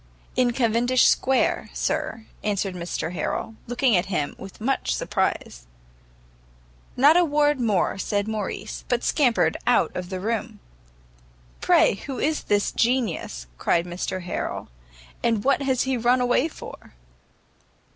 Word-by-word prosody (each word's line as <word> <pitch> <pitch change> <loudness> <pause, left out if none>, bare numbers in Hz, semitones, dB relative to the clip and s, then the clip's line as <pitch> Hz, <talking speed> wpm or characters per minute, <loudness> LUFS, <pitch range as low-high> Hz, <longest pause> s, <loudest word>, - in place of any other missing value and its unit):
"In 250 -1 +3
Cavendish 240 +1 +2
Square, 265 0 +2
sir," 300 -8 -2 0.2
answered 200 -2 -1
Mr 175 -1 -4
Harrel, 225 - -3
looking 245 -1 +2
at 175 +1 +1
him 150 -7 -1
with 195 0 -10
much 265 +5 0
surprise. - - -2 1.3
Not 290 +6 +6
a 355 - +5
word 295 -2 +2
more 205 -5 +1
said 205 +1 -1
Morrice, 215 -3 -4
but 245 -1 0
scampered 255 -7 +2
out - - +3
of 180 -1 -4
the 185 -1 -4
room. 220 +3 -3 1.0
"Pray - - +4
who 270 -2 -4
is 305 +1 -1
this 205 0 +1
Genius?" 225 - -1
cried 170 0 +1
Mr 180 +1 -4
Harrel, 175 - -4 0.5
"and 225 -3 +1
what 275 +1 +2
has 265 -2 +1
he 265 -1 0
run 240 +2 +3
away 250 +4 +2
for?" 305 - -11
230 Hz, 135 wpm, -24 LUFS, 195-260 Hz, 1.3 s, Not